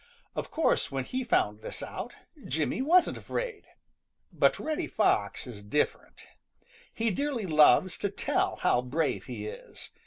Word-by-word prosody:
Of - - -3
course 320 - +1
when 135 -1 -1
he 255 - -3
found 105 - +1
this - - -6
out, - - -6 0.3
Jimmy 155 - 0
wasn't 345 +6 +4
afraid. 485 -4 -4 0.7
But - - +3
Reddy 310 -1 -2
Fox - - +1
is 115 -5 -8
different. 105 +9 -2 0.7
He 225 0 0
dearly 275 -1 -1
loves 160 +2 +5
to 205 - 0
tell 195 - 0
how 125 - +2
brave 145 +5 -1
he 115 -5 -6
is. 105 - -9
165 Hz, 145 wpm, -29 LUFS, -, 0.7 s, loves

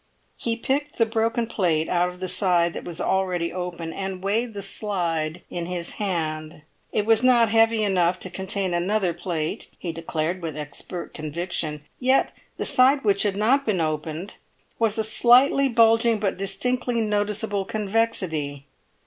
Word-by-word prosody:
He 230 -1 -2
picked 285 +5 -2
the 230 - +4
broken 230 +1 0
plate 170 -8 0
out 175 0 +2
of 180 0 -11
the 185 - -3
side 180 -2 +2
that - - -7
was 170 -2 -4
already 180 -3 0
open, 175 -2 -5
and 190 -1 -5
weighed 220 +3 -1
the 200 - -4
slide 175 -5 -2
in 170 -1 -5
his 175 -1 -3
hand; 155 -5 -3 0.3
it 210 - 0
was 225 0 +4
not 245 -3 +5
heavy 225 0 +3
enough 185 -3 +2
to 185 - -3
contain 190 -1 -2
another 180 +1 +1
plate, 165 -3 -3
he 175 - -4
declared 165 +2 -3
with 160 -2 -5
expert 150 +4 -6
conviction; 155 -1 -3 0.2
yet 260 +1 +3 0.3
the - - -2
side 270 +2 +4
which 200 -2 +3
had 205 -2 +1
not 250 +7 +3
been 215 -8 0
opened 155 +3 -3 0.4
was 225 -2 +2
a 220 - +1
slightly 250 +5 +4
bulging 230 -1 +4
but 200 -2 0
distinctly 240 +6 -1
noticeable 210 -1 0
convexity. 190 -10 -1
195 Hz, 155 wpm, -24 LUFS, 170-225 Hz, 0.4 s, not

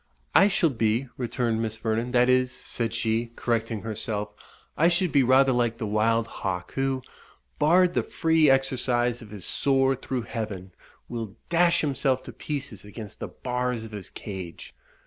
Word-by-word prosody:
"I 195 - +7
shall 175 -5 +2
be," 115 +2 0
returned 120 -2 -1
Miss 110 -1 -2
Vernon 115 +1 -1
"that 125 -1 +4
is," 130 0 +3
said 115 -2 -3
she, 115 +1 -1
correcting 115 -2 -1
herself 105 -1 -3 0.4
"I 165 - +4
should 175 -1 +2
be 140 - +5
rather 130 +1 +5
like 120 -2 +1
the - - -3
wild 110 +2 +2
hawk, 90 -5 -4
who, 135 -1 -1 0.6
barred 175 +4 +4
the - - +2
free 160 -2 +2
exercise 125 -2 +2
of 110 - -11
his 100 -3 -7
soar 135 -1 +2
through 130 -1 -3
heaven, 105 -6 -5 0.4
will 115 -4 -5
dash 170 0 +4
himself 135 -3 0
to 125 - -9
pieces 135 -5 -5
against 105 0 -9
the - - -4
bars 125 -2 -2
of 110 - -9
his 100 -3 -7
cage. 95 -5 -8
120 Hz, 165 wpm, -26 LUFS, 110-135 Hz, 0.6 s, I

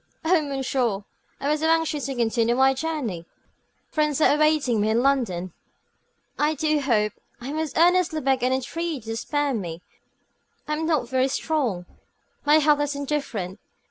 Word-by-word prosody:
"Oh, 340 0 +4
monsieur, 260 -7 -1 0.4
I 280 - -3
was 300 +1 +1
so 320 - +1
anxious 320 -4 +1
to 270 - -4
continue 235 0 +1
my 265 +1 +4
journey. 260 - -3 0.6
Friends 300 -2 +1
are 300 - +5
awaiting 300 -7 +2
me 215 - +1
in 230 +3 +2
London. 195 -11 0 0.9
I 300 +1 +2
do 305 +1 +1
hope 215 -7 +1 0.3
I 250 +3 -6
most 315 -2 -3
earnestly 350 -1 +3
beg 265 -2 +1
and 250 +1 +1
entreat 280 +1 -3
you 225 - -4
to - - -4
spare 290 +3 -1
me. 175 -6 -5 0.8
I 300 - -1
am 320 +1 -2
not 300 -7 +1
very 260 +1 +1
strong; 265 - -1 0.6
my 295 +1 +5
health 300 -1 +3
is 290 0 -1
indifferent. 260 -10 -3
275 Hz, 165 wpm, -24 LUFS, 235-305 Hz, 0.9 s, are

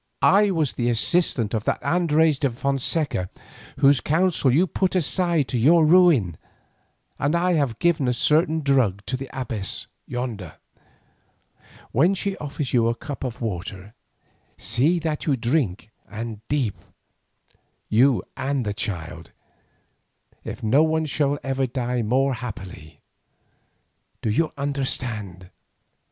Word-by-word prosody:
"I 205 +2 +5
was 160 -7 0
the 120 -1 -1
assistant 120 - +1
of 110 -2 -1
that - - +1
Andres 160 -4 +2
de 140 - +1
Fonseca 135 - -1 0.5
whose 140 -1 +5
counsel 160 -3 +2
you 160 +9 +4
put 190 +1 -1
aside 170 -3 +1
to 125 - -1
your 160 +7 +5
ruin, 155 - +4 0.8
and 145 +4 +1
I 180 +1 +2
have 140 -8 0
given 160 -6 +1
a 125 - +2
certain 155 +5 +2
drug 125 -9 +1
to 130 - -2
the 135 +1 -7
abbess 115 -7 -3 0.2
yonder. 115 -9 -5 1.4
When 170 +10 +3
she 195 0 -2
offers 145 -2 -4
you 115 -2 +3
the 115 - 0
cup 140 +4 -7
of 125 -2 -5
water, 100 -1 -5 0.6
see 125 - +1
that 160 -2 -3
you 145 - +3
drink 115 - -1 0.2
and 110 -1 -6
deep, 125 -10 -1 1.1
you 125 +3 +3
and 135 -2 -2
the 105 - -2
child. 85 -6 -5 1.1
If - - -7
so 110 - -3
none 160 +6 +3
shall 145 -1 0
ever 135 -1 -1
die 125 -1 -2
more 130 +5 +1
happily. 95 -10 -8 1.2
Do 110 - 0
you 155 +9 +1
understand?" 120 -10 -3
135 Hz, 130 wpm, -23 LUFS, 115-155 Hz, 1.4 s, I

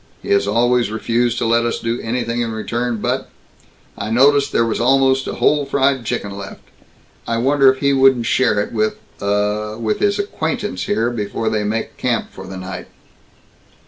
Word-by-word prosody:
He - - -4
has 100 0 +3
always 120 +3 +2
refused 115 +2 0
to - - -1
let 115 +1 +3
us 120 - -1
do 115 +1 -2
anything 120 0 -2
in 115 -1 -2
return 120 +2 -2
but - - -2 0.7
I 100 - -5
noticed 140 +4 +4
there 115 - +2
was 115 - -2
almost 135 +1 +3
a - - -4
whole 150 -1 +2
fried 135 -2 +1
chicken 100 -1 -3
left. 100 0 -9 0.6
I 115 - 0
wonder 135 +2 +4
if 130 - -8
he 140 -1 +3
wouldn't 135 -3 +4
share 110 -3 +2
it 105 - -3
with, 110 -1 0 0.2
uh, 105 +1 -1
with 110 -2 -1
his 205 0 +2
acquaintance 160 - -3
here 115 +3 0
before 110 -1 -4
before 110 - +2
they 110 -1 0
make 110 +2 -3
camp 120 -3 -1
for 95 0 -10
the 95 0 -7
night?" 95 0 -7
115 Hz, 185 wpm, -19 LUFS, 105-130 Hz, 0.7 s, noticed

